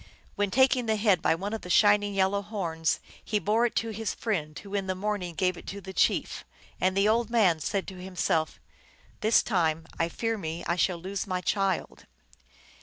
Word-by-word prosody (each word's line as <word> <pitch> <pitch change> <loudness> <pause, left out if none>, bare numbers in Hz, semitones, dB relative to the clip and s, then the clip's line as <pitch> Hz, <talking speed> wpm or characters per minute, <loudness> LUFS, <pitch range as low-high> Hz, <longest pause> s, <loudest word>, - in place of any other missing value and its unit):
Then 205 -1 0
taking 255 +1 +3
the 220 - +2
head 205 -5 +3
by - - +3
one 200 +5 -4
of 225 - -3
the 180 - -9
shining 205 +1 +4
yellow 195 +1 +2
horns 170 -7 -2 0.2
he 215 - 0
bore 220 +3 +2
it - - -9
to 225 - 0
his 220 0 -3
friend, 160 -9 -2
who 200 -1 -10
in 195 -2 -1
the 185 - -1
morning 190 -3 -3
gave 180 +1 0
it - - -12
to 200 - -5
the 190 -1 -9
chief. - - +1 0.4
And 185 +1 +1
the 200 +1 +4
old 230 +1 +2
man 200 -9 +3
said 195 +4 -2
to 185 -1 -10
himself, 175 -4 -1 0.3
" - - -30
This 220 +2 +4
time 165 -6 0
I 165 - +1
fear 225 +4 -2
me 165 0 -5
I 170 - 0
shall 180 0 +1
lose 190 +3 -4
my 185 0 -1
child." 195 0 -1
195 Hz, 205 wpm, -28 LUFS, 180-210 Hz, 0.4 s, shining